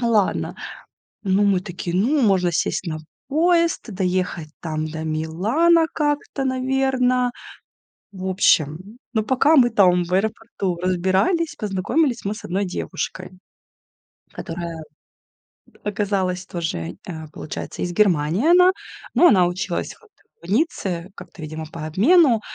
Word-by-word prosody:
Ну, 235 - +1
ладно. 210 -4 +1 0.7
Ну, 195 0 +2
мы 195 -2 +3
такие: 175 -1 -5
"Ну, 260 +10 +2
можно 190 -5 +3
сесть 170 - -1
на 155 - -3 0.3
поезд, 335 +3 +2
доехать 180 -4 -2
там 155 -1 -3
до 160 0 -6
Милана 210 - +2
как-то, 295 -2 -1
наверно". 255 -1 +1 0.8
В 190 -1 -6
общем, 185 +2 +1 0.2
но, 220 -2 +1
пока 265 +7 +3
мы 250 -5 +6
там 180 -4 +4
в 175 - -5
аэропорту 200 -2 -1
разбирались, 190 - +1
познакомились 230 - 0
мы 205 +2 -1
с - - -11
одной 195 +3 -1
девушкой, 185 0 -5 1.0
которая 165 -1 -6 1.0
оказалась 195 -3 -1
тоже, 160 - -4
а, 160 -3 -7
получается, 155 - -7
из 175 -1 -2
Германии 180 - +2
она, 360 +1 +7 0.4
но 350 - +6
она 185 - +5
училась 175 0 -3
вот 445 - -22 0.3
в 175 - -7
Ницце 195 - -1
как-то, 175 - -12
видимо, 155 +1 -6
по 165 -2 -6
обмену. 235 - +4
195 Hz, 130 wpm, -22 LUFS, 175-255 Hz, 1.0 s, она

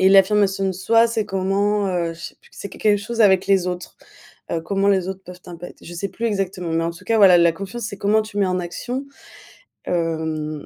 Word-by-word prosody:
Et 190 - +6
l'affirmation 195 0 +4
de 190 - +1
soi, 225 +5 +3
c'est 220 -2 -1
comment, 200 +1 0
heu, 170 -2 -1
je 165 - -15
sais - - -8
plus - - -24
q - - -20
c'est 200 - -6
q - - -13
quelque 210 -1 +3
chose 230 +3 -4
avec 190 -3 +5
les 190 -2 +3
autres. 180 -1 -5 0.5
Heu, 165 - -1
comment 195 +4 -1
les 190 -2 +2
autres 190 0 -6
peuvent 180 0 -11
t'impac 175 -1 -10
je 175 - -10
sais 195 +3 -3
plus 230 +4 -4
exactement. 190 -4 -2
Mais 165 0 0
en 170 - -1
tout 170 - -15
cas 225 - +1
voilà 190 -3 +8
la 170 -1 +4
confiance, 195 +7 -7
c'est 200 - -5
comment 210 +2 +2
tu 215 -1 -7
mets 195 - +3
en 185 0 0
action. 245 +10 -5 0.8
Hem, 160 -3 -2
190 Hz, 235 wpm, -21 LUFS, 175-205 Hz, 0.8 s, voilà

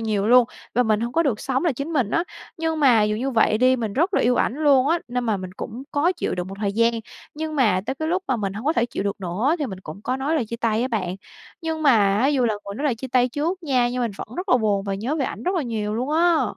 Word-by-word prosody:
nhiều 210 -3 0
luôn, 245 +2 +7 0.3
và 245 - +4
mình 215 -3 +1
hông 235 +1 -3
có 330 - +3
được 255 -9 0
sống 265 +3 -1
là 335 - +2
chính 280 +6 -5
mình 255 -9 +1
á. 335 +7 +1 0.3
Nhưng 320 -1 -2
mà 245 -7 +5
dù 210 0 +1
như 260 +5 -2
vậy 220 -3 +3
đi, 255 +2 +4
mình 225 -4 -3
rất 345 - +1
là - - +3
yêu 245 +1 +3
ảnh - - +1
luôn 280 -3 +3
á, 335 +2 +3
nên 245 0 -2
mà 220 -3 +1
mình 185 -1 -7
cũng 235 +3 -6
cố 320 +6 +2
chịu - - -2
đựng 180 0 -4
một 195 - -7
thời 200 -2 0
gian. 230 +2 +3 0.4
Nhưng 315 0 -4
mà 210 -9 +3
tới 265 - -1
cái 315 +3 -3
lúc 365 +3 0
mà 260 - +2
mình 195 -3 -2
hông 215 +4 -7
có 310 - +4
thể 235 -7 +1
chịu 230 - -4
được 200 0 -3
nữa 195 - 0
thì 295 - -1
mình 190 -5 -7
cũng 190 +4 -10
có 255 - -1
nói 280 +4 -1
lời 250 -8 0
chia 235 - -5
tay 230 -1 0
á 255 - -1
bạn. 190 -6 -2 0.5
Nhưng 320 -1 -3
mà 285 - +6 0.3
á, 255 - +3
dù 275 -3 +2
là 225 -2 +1
người 200 -1 -8
nói 285 - -4
lời 270 - +2
chia 260 +4 -7
tay 250 0 +3
trước 330 +8 -2
nha, 255 -5 +2
nhưng 250 0 -2
mình 235 - 0
vẫn - - -6
rất 370 +3 -4
là 355 - +5
buồn 205 -3 0
và 195 - -2
nhớ 235 +10 -2
về 275 - 0
ảnh - - -5
rất 365 +2 0
là 340 - 0
nhiều 215 -3 -3
luôn 250 +5 -2
á. 335 +1 +3
250 Hz, 310 wpm, -23 LUFS, 215-295 Hz, 0.5 s, luôn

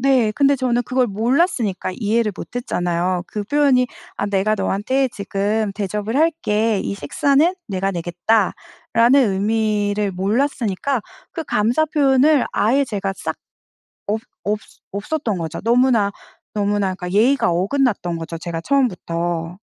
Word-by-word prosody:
네. 255 -4 +3
근데 280 +4 +3
저는 245 -2 0
그걸 255 +1 +1
몰랐으니까 225 - 0
이해를 220 0 +1
못 - - -9
했잖아요. 180 - -1
그 210 - -4
표현이 265 +1 +3 0.3
"아 205 - -1
내가 200 +1 +1
너한테 260 +7 0
지금 205 0 -1
대접을 210 +3 -2
할게. 230 -10 +1
이 - - -3
식사는 280 - +2
내가 195 -1 -1
내겠다."라는 220 +6 +1
의미를 205 0 0
몰랐으니까 230 +4 0 0.3
그 330 - -4
감사 235 +6 +2
표현을 290 -2 +3
아예 265 +7 +2
제가 200 -5 -3
싹 - - -4 0.7
없 220 +1 0 0.2
없었 210 +1 -4
없었던 215 +1 -2
거죠. 165 -2 -4
너무나, 235 -3 +3 0.4
너무나 205 -2 0
그니까 180 -1 -6
예의가 235 +1 +3
어긋났던 195 -1 0
거죠 165 0 -6
제가 170 -1 -4
처음부터. 175 -9 -1
215 Hz, 300 characters per minute, -20 LUFS, 195-260 Hz, 0.7 s, 네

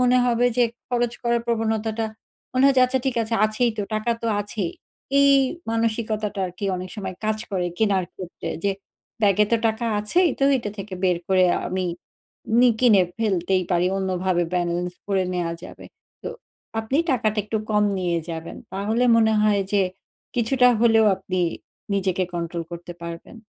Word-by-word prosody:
মনে 250 0 +4
হবে 240 0 +3
যে 245 - +5 0.2
খরচ 240 -1 0
করার 235 0 +1
প্রবণতাটা 225 -1 0 0.5
মনে 255 +1 +2
হয় 275 - +5
আচ্ছা 260 +1 0
ঠিক 250 -2 0
আছে 225 +1 -2
আছেই 215 +3 +1
তো। - - +1
টাকা 215 +2 0
তো - - -1
আছেই। 205 -4 -3 0.5
এই 280 0 +6 0.4
মানসিকতাটা 220 -2 -1
আর 180 - -8
কি - - -4
অনেক 180 0 -6
সময় 190 -3 -5
কাজ 215 0 0
করে 185 -3 0
কেনার 200 -4 +2
ক্ষেত্রে 180 -2 -7 0.2
যে 200 - +3 0.5
ব্যাগে 205 +1 +4
তো 230 - +6
টাকা 220 +1 -1
আছেই, 345 - +2
তো 275 - +2
এইটা 225 -4 -4
থেকে 195 -1 -6
বের 180 -2 +2
করে 185 -1 +4 0.2
আমি 185 0 -1 0.7
নি 245 0 +7
কিনে 215 -7 +6 0.2
ফেলতেই 190 -3 +1
পারি 175 0 +2
অন্যভাবে 185 -2 0
ব্যালেন্স 175 0 0
ভরে 195 -2 +1
নেওয়া 170 -2 -1
যাবে। - - -11 0.4
তো - - -4 0.5
আপনি 220 +5 -2
টাকাটা 215 -4 +1
একটু 215 +1 -2
কম 210 -1 +3
নিয়ে 175 -2 0
যাবেন 165 0 -6 0.2
তাহলে 215 +5 0
মনে 220 -1 +4
হয় 205 -2 +3
যে 200 - +4 0.5
কিছুটা 250 +1 +4
হলেও 225 -2 +5
আপনি 185 -1 -3 0.5
নিজেকে 190 -1 0
কন্ট্রোল 170 0 -3
করতে 175 0 -7
পারবেন। 170 +7 -8
210 Hz, 165 wpm, -23 LUFS, 185-230 Hz, 0.7 s, নি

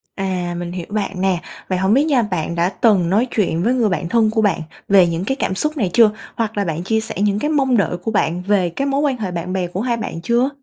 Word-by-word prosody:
À, 180 -3 -2
mình 175 0 -5
hiểu 175 -1 -5
bạn 200 -3 -3
nè, 190 -3 +1 0.3
vậy 185 - 0
hổng 190 +3 +2
biết 275 +3 +4
nha 275 -6 +3
bạn 170 -4 -3
đã 170 +1 +2
từng 195 -4 +2
nói 215 +7 +2
chuyện 175 -5 0
với 240 +5 +2
người 235 -4 +2
bạn 170 -2 -2
thân 225 -1 +3
của 220 -1 +1
bạn 190 -5 +1 0.3
về 195 -3 +6
những 170 +2 -2
cái 265 - 0
cảm 190 - -2
xúc 305 +8 -1
này 205 -9 0
chưa? 225 -3 +6 0.2
Hoặc 220 -2 -2
là 200 - +1
bạn 165 0 -3
chia 220 +3 +1
sẻ 225 - -6
những 205 0 +1
cái 295 - -1
mong 270 -5 +2
đợi 185 -3 0
của 200 +5 -4
bạn 175 -3 0
về 190 -2 +1
cái 275 +11 -3
mối 275 +1 +1
quan 275 -4 +1
hệ 195 -5 -4
bạn 175 +2 -4
bè 185 -2 -1
của 185 +3 -4
hai 240 -1 0
bạn 165 -6 -5
chưa? 240 +7 +2
200 Hz, 275 wpm, -19 LUFS, 180-230 Hz, 0.3 s, về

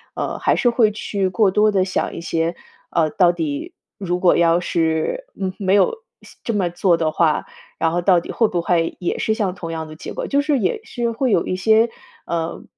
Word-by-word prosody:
呃， - - -3
还 - - +2
是 245 - +3
会 235 -3 +3
去 200 -2 -2
过 195 +2 +3
多 210 +2 +3
地 190 -2 +2
想 190 - -2
一 - - -6
些， 165 0 -1 0.3
呃， 160 -2 +1
到 180 -2 +4
底 155 -5 -4 0.2
如 180 -2 -2
果 180 -1 +4
要 170 0 +3
是， 165 - -1
嗯， 190 -1 -2
没 195 -1 +2
有 205 - +4 0.3
西 - - -16
这 230 - -2
么 190 -4 0
做 175 0 +2
的 160 -1 0
话， 155 -1 +1 0.3
然 165 - +1
后 175 +1 0
到 180 -1 +4
底 170 - -7
会 225 - +2
不 175 -4 -1
会 170 -1 0
也 175 - -2
是 220 - +1
像 205 -4 -1
同 165 -2 -6
样 160 -1 -4
的 155 - -10
结 - - -8
果， - - -4
就 280 - +1
是 290 -1 +1
也 210 - 0
是 240 - -3
会 245 +1 0
有 170 - +2
一 185 - -1
些， 220 +4 +3 0.4
呃， 165 -1 -3
180 Hz, 240 characters per minute, -20 LUFS, 170-210 Hz, 0.4 s, 到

